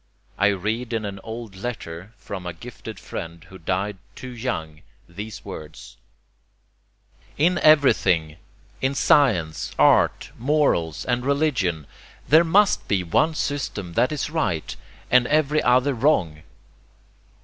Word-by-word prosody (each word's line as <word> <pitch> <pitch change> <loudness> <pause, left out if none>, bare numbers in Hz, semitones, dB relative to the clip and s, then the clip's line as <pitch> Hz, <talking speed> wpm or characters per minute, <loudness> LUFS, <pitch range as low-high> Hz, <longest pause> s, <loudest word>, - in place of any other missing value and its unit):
I 100 - +5
read 110 +5 -2
in 110 -2 -1
an 100 -1 -6
old 115 -3 -7
letter 95 -4 -6
from 95 -3 -7
a 90 - -4
gifted 105 +2 -10
friend 85 0 -7
who 95 0 -14
died 95 +4 -2 0.2
too 130 - -8
young 80 -11 -4 0.3
these 105 +5 -8
words: 75 0 -9 1.4
"In 175 +5 +2
everything, 90 - +4 0.4
in 135 +1 0
science, 105 - +2
art, - - +3
morals 125 - +1
and 125 0 0
religion, 130 - 0 0.4
there 160 +3 +6
MUST 195 +5 +3
be 95 -3 +1
one 155 - +1
system 115 -13 -3
that 125 - +2
is 150 -1 -3
right 85 - -2 0.4
and 125 0 +5
EVERY 155 0 +2
other 125 +3 +3
wrong." 110 - +1
110 Hz, 125 wpm, -23 LUFS, 90-140 Hz, 1.4 s, there